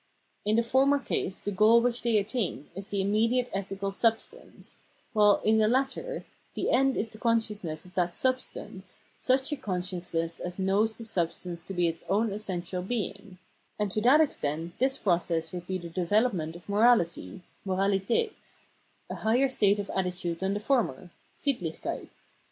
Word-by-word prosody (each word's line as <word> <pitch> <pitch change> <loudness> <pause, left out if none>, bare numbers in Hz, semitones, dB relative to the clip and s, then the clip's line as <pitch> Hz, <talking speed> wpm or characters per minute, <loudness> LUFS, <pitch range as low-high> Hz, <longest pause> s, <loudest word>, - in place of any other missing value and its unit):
In 210 +1 +3
the 230 - +3
former 270 +4 +3
case 200 -7 -2
the 205 - -3
goal 215 +4 +6
which 240 0 0
they 235 -2 +2
attain 205 - -2
is 195 +1 -7
the 200 -2 -1
im 195 +1 0
mediate 230 +4 +2
ethical 195 0 -3
substance; 225 +3 -2 0.3
while, 210 -2 +5
in 220 +1 +4
the 215 - +4
latter, 270 - -1 0.3
the - - 0
end 270 +1 +3
is 220 0 -1
the 215 - -12
consciousness 210 -9 0
of 180 - -15
that 175 -2 0
substance, 255 -7 -2 0.2
such 265 +2 +1
a - - +1
con 185 -9 -3
sciousness 175 -2 -3
as 180 0 -5
knows 200 +3 +1
the 230 - -7
substance 175 -3 -2
to 195 - -7
be 175 -1 +2
its 165 0 -4
own 210 +2 +2
essential 185 -3 -3
being; 200 -2 -4 0.4
and 210 -2 -1
to 215 - 0
that 265 +7 +6
extent 165 - -1
this 265 +2 +2
process 170 -3 0
would 175 -1 -6
be 190 - -1
the 175 -2 -8
development 180 -1 0
of 175 - -12
morahty 200 - +2 0.2
{Moralitdt), 195 - +1 0.8
a - - -3
higher 240 +5 +2
state 205 -6 +2
or 200 - -2
attitude 180 -2 -2
than 190 +1 0
the - - -1
former 210 - 0 0.2
(SittlichJceit). 190 - -3
200 Hz, 170 wpm, -28 LUFS, 180-230 Hz, 0.8 s, goal